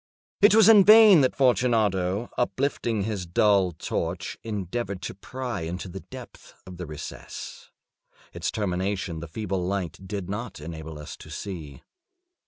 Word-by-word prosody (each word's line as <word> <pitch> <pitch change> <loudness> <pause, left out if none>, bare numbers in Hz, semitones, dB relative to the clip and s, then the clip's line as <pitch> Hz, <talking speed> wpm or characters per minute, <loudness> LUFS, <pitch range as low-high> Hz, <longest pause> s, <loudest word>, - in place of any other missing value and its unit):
It 205 0 +7
was 220 -1 +7
in 215 -3 +8
vain 215 -4 +8
that 130 - +1
Fortunato, 110 -6 +1
uplifting 120 -4 -1
his 100 -4 -3
dull 95 +1 +3
torch, 80 - -4
endeavored 100 -1 -4
to - - -4
pry 125 0 -5
into 85 +4 -5
the 95 +2 -7
depths 125 +1 -12
of 90 -1 -10
the 90 -1 -6
recess. 75 0 -8 0.6
Its - - -2
termination 95 -3 -2
the 85 - -7
feeble 95 +2 -3
light 95 -2 -3
did 100 -2 -4
not 105 +2 -5
enable 80 0 -8
us 75 - -8
to - - -13
see. 85 -8 -7
100 Hz, 145 wpm, -26 LUFS, 90-120 Hz, 0.6 s, in